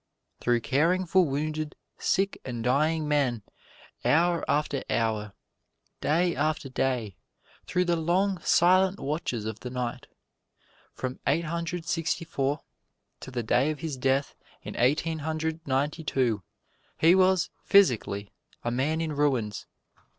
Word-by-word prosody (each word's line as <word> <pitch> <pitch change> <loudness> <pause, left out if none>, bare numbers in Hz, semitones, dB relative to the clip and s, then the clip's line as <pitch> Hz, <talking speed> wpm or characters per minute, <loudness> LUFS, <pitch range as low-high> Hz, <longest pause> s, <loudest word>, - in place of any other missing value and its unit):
Through 120 -1 +1
caring 165 +9 +2
for 185 +2 +4
wounded, 155 +2 -2 0.2
sick 195 +1 0
and 120 -3 -5
dying 150 +5 +2
men, 135 -7 +1 0.6
hour 170 +2 +3
after 145 -2 0
hour, 110 -3 0 0.7
day 170 +3 +1
after 155 -1 -1
day, 125 -7 -1 0.5
through 180 0 +1
the 175 -1 +2
long, 180 +4 +1
silent 185 +3 +4
watches 135 -7 -2
of 110 -1 -4
the 125 - -6
night. 125 -1 -4 0.9
From 130 0 -4
Eighteen 165 +4 +2
Hundred 170 0 -3
Sixty 165 0 -1
four 140 -2 -1 0.6
to - - -9
the 125 -2 -3
day 125 +6 +2
of 155 -1 -4
his 160 -4 -3
death 135 +2 0 0.3
in - - -7
Eighteen 155 +6 +1
Hundred 160 +1 -2
Ninety 145 +4 0
two, 120 -8 0 0.6
he 165 +2 +6
was, 185 -1 +3
physically, 115 - +3 0.3
a 120 - -1
man 145 +6 0
in 160 -2 -2
ruins. 130 -8 0
150 Hz, 135 wpm, -27 LUFS, 125-165 Hz, 0.9 s, he